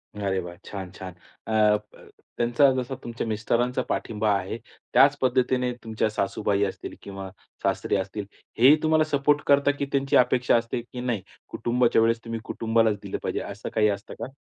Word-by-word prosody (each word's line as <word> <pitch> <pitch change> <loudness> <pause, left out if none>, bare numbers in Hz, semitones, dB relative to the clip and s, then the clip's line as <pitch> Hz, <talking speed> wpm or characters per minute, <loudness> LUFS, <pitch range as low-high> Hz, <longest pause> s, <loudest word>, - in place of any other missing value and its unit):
अरे 100 -2 -1
वा! 85 -1 -7
छान, 95 -3 -7
छान. 95 -1 -9 0.3
अ, - - -4 0.3
ब, 105 0 -18 0.3
त्यांचा 120 +4 +4
जसा 130 +1 -3
तुमच्या 120 0 -4
मिस्टरांचा 120 +4 0
पाठिंबा 110 -1 0
आहे, 95 +4 -4 0.4
त्याच 140 +1 +6
पद्धतीने 125 -1 +2
तुमच्या 110 -1 -1
सासूबाई 100 0 0
असतील 95 - -6
किंवा 95 -1 -7 0.3
सासरे - - 0
असतील, 100 +2 -4 0.3
हेही 135 +5 +8
तुम्हाला 155 0 +4
सपोर्ट 145 +1 +3
करतात 140 0 +4
की 140 - 0
त्यांची 135 0 +1
अपेक्षा 125 0 +3
असते 115 +1 -2
की 125 +1 -8
नाही 120 -5 -1 0.3
कुटुंबाच्या 120 -1 +2
वेळेस 115 +1 +2
तुम्ही 115 0 -4
कुटुंबालाच 115 -2 +1
दिलं - - -4
पाहिजे, - - -1
असं - - -6
काही 105 -1 +3
असतं 100 0 -4
का? 115 - -4
115 Hz, 165 wpm, -25 LUFS, 105-125 Hz, 0.4 s, हेही